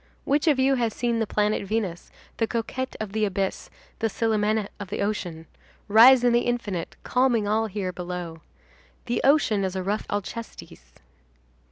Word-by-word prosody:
Which 290 +3 +1
of 295 -4 +4
you 265 +1 +3
has 225 -2 0
seen 235 -1 0
the 225 - 0
planet 210 +1 +1
Venus, 200 -4 -3 0.3
the 225 - +1
coquette 245 +3 -3
of 215 -2 -4
the 215 +1 -1
abyss, 195 -1 -2 0.3
the 225 - +1
Célimène 215 -1 0
of 205 - -6
the - - -4
ocean, 175 -6 -3 0.4
rise 240 +4 +7
in 245 -1 +4
the 240 - +5
infinite, 205 -8 -3
calming 250 -4 +2
all 220 +2 +1
here 190 -3 -4
below? 175 -2 -6 0.6
The 240 - -1
ocean 270 -8 +3
is 190 0 -2
a 190 - -2
rough 205 +3 -2
Alcestis. 205 - -7
215 Hz, 165 wpm, -25 LUFS, 195-235 Hz, 0.6 s, rise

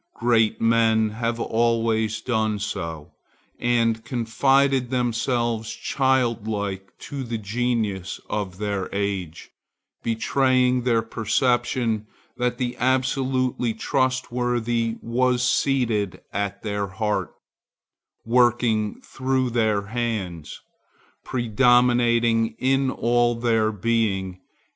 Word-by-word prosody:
Great 115 -2 +2
men 115 -1 +3
have 115 +1 -2
always 115 -1 +1
done 110 -4 0
so, 85 -7 -5 0.5
and 115 -2 +1
confided 130 +2 +2
themselves 120 -2 -1
childlike 110 -8 -1
to 140 -2 -7
the 115 -2 -3
genius 110 -3 -2
of 95 -4 -3
their 100 -2 -2
age, 100 -5 -3 0.5
betraying 125 +2 +2
their 120 -2 +1
perception 115 -1 0 0.3
that 125 0 -1
the 125 -1 -2
absolutely 130 -2 0
trustworthy 120 -2 0
was 125 +1 +1
seated 120 -7 +1
at 100 -1 -3
their 100 -2 -2
heart, 105 +2 -2 0.9
working 115 -3 +2
through 130 -1 -1
their 110 -3 +1
hands, 100 -8 -4 0.6
predominating 120 -1 +3
in 135 +1 +1
all 120 -1 +1
their 115 -2 +1
being. 100 -4 -1
115 Hz, 90 wpm, -23 LUFS, 110-125 Hz, 0.9 s, men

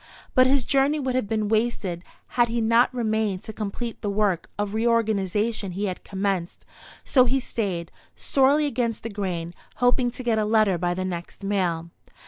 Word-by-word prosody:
But 255 -1 +6
his 265 -2 +3
journey 275 +2 +2
would 260 -2 -1
have 255 -5 0
been 215 0 0
wasted 215 -5 -1 0.3
had 240 -1 +3
he 235 +1 -1
not 230 +2 +4
remained 220 -5 -1
to 220 - -7
complete 220 +3 -5
the 205 - -2
work 200 -4 0
of 205 0 -2
reorganization 220 -3 0
he 200 +3 -2
had 185 -2 -4
commenced; 190 -3 -3 0.4
so 255 -2 +5
he 265 +2 +2
stayed, 190 -9 -3 0.2
sorely 280 +2 +3
against 235 -5 -1
the 230 - -4
grain, 180 -4 -3 0.2
hoping 245 0 +2
to 255 +1 -7
get 230 -2 +1
a - - +2
letter 210 -4 +3
by 175 0 0
the 185 0 -2
next 175 +2 -6
mail. 175 -4 -1
215 Hz, 175 wpm, -25 LUFS, 190-240 Hz, 0.4 s, But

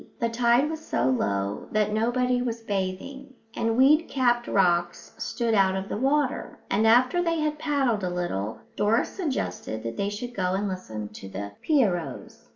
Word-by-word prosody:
The 235 -2 +1
tide 240 +4 +3
was 315 0 -5
so 130 - 0
low 100 -5 -1
that 210 0 +1
nobody 245 +3 +1
was 235 -2 -3
bathing, 225 +7 -4 0.2
and 225 0 0
weed 300 +5 +5
capped 240 -3 +1
rocks 175 -2 +1
stood 235 -3 -1
out 195 -2 +4
of 190 +1 -4
the - - -2
water; 270 +2 0
and 220 +3 +3
after 255 +9 +4
they 335 -2 0
had 305 0 -1
paddled 270 -9 +1
a 180 - 0
little 115 - -3
Doris 215 +3 +2
suggested 265 - -3
that 115 0 -5
they 200 0 0
should 240 +4 -6
go 185 -3 0
and 200 +1 -1
listen 110 - -5
to 100 -2 -10
the 100 +1 -6
pierrots. 185 - -1
225 Hz, 170 wpm, -26 LUFS, 180-260 Hz, 0.2 s, weed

